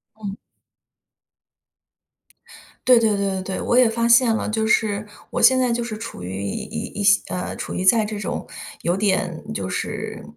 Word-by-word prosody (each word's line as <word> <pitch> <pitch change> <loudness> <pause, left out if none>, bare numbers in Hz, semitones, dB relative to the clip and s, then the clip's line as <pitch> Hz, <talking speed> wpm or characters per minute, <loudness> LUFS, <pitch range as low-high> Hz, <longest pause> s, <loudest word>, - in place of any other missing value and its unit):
嗯。 205 -2 -6 2.5
对 250 -1 +8
对 220 -3 +2
对 200 0 0
对 - - -7
对， 190 0 -4
我 240 - +1
也 250 -2 +6
发 230 +1 0
现 235 0 +5
了， 220 - -2
就 220 0 0
是， 215 -1 +1 0.2
我 - - -2
现 260 0 +6
在 250 -2 +2
就 235 0 -1
是 225 -2 -5
处 220 - -8
于 95 +2 -5
一 100 -1 -3
一 - - -4 0.2
一 - - -1
些 200 0 +5
呃， 180 - -4
处 - - -5
于 185 - -2
在 215 +3 +5
这 210 0 -5
种， 205 - -4 0.4
有 175 +1 +1
点 190 -4 0
就 95 - -3
是， - - -4
215 Hz, 195 characters per minute, -22 LUFS, 190-230 Hz, 2.5 s, 对